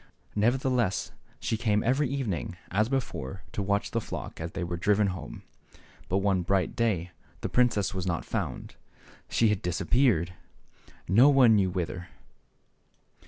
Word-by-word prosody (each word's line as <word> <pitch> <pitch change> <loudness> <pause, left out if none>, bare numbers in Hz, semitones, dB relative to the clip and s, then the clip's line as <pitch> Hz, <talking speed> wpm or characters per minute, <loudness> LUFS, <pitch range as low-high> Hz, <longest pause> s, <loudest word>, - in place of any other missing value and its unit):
Nevertheless 120 -1 +1 0.3
she 110 - -1
came 105 -2 +1
every 130 +3 +2
evening, 100 - -3
as 110 +5 +2
before, 95 - -3
to - - -3
watch 100 +1 0
the 115 - 0
flock - - -7
as 80 +1 -5
they 95 - -3
were 85 0 -3
driven 105 +4 +2
home. 90 - -8 0.7
But 95 - +2
one 95 -2 +3
bright 95 +2 0
day 95 -7 0 0.3
the - - -2
princess 105 -6 +2
was 95 -1 -3
not 85 -2 -1
to - - -20
be - - -21
found; - - -3 0.5
she 115 - +3
had 105 -2 0
disappeared, 90 - +2 0.7
no 115 +10 +6
one 130 -6 +6
knew 95 -3 +3
whither. 90 0 -4
100 Hz, 155 wpm, -28 LUFS, 90-115 Hz, 0.7 s, no